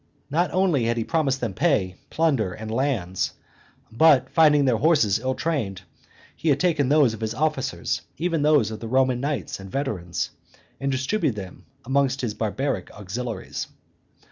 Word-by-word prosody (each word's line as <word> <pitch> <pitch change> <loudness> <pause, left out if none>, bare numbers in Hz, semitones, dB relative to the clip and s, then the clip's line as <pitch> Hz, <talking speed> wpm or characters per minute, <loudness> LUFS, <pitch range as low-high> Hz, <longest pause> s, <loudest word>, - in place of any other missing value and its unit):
Not 175 +4 +2
only 180 -10 +2
had 120 +1 0
he 115 - 0
promised 140 -3 0
them 115 -5 -2
pay, 100 - +1
plunder, 140 - +1
and 110 0 -7
lands, 115 -8 -1 0.6
but, 130 +1 +4
finding 150 -3 +5
their 125 -4 +3
horses 125 - +3
ill 130 +2 -1
trained, 135 - -2 0.5
he 160 - -1
had 140 -1 +3
taken 155 -6 +2
those 145 -6 +4
of 110 - -8
his 110 0 -2
officers, 145 -2 -1 0.2
even 165 -2 0
those 145 -8 +3
of 110 - -6
the 115 - -6
Roman 130 0 +2
knights 140 -6 -3
and 95 0 -9
veterans, 105 - -2 0.5
and 140 0 -1
distributed 135 - 0
them 95 -3 -9 0.2
amongst 135 +1 +1
his 120 -4 -2
barbaric 110 -1 -2
auxiliaries. 105 +2 -5
130 Hz, 160 wpm, -24 LUFS, 110-150 Hz, 0.6 s, finding